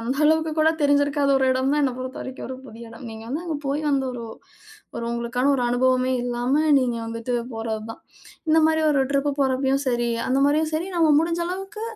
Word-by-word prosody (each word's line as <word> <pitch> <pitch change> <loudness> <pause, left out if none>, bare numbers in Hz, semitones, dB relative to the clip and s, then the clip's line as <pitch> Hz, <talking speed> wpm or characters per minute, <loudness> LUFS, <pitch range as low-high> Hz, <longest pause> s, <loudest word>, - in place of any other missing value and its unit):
அந்த 245 +4 -2
அளவுக்குக் 315 0 +2
கூடத் 320 +1 +3
தெரிஞ்சிருக்காத 285 0 +2
ஒரு 265 - +2
எடம் 260 +1 +1
தான் 295 - +2
என்ன 265 -2 +1
பொறுத்தவரைக்கும் 260 0 -6
ஒரு 260 - -6
புதிய 230 -2 -11
இடம். 230 +3 -12
நீங்க 220 0 -9
வந்து 300 +7 -3
அங்க 320 -3 -3
போய் 285 +3 -1
அந்த 275 -1 +1
ஒரு 235 -2 -6 0.7
ஒரு 235 - -4
உங்களுக்கான 235 +3 0
ஒரு 255 - 0
அனுபவமே 255 +1 +2
இல்லாம 245 +3 0 0.2
நீங்க 245 -2 0
வந்துட்டு 230 +2 -4 0.2
போறதுதான். 225 0 -5 0.5
இந்த 315 +1 +5
மாரி 315 0 +2
ஒரு 285 - +2
ட்ரிப்பு 280 +1 +1
போறப்பயும் 265 0 +1
சரி, 240 -1 +1 0.2
அந்த 260 +1 +1
மாரியும் 305 +2 +2
சரி 320 +3 -1
நம்ம 325 -2 +4
முடிஞ்ச 335 +2 0
அளவுக்கு, 390 +4 -6
265 Hz, 190 wpm, -23 LUFS, 245-305 Hz, 0.7 s, இந்த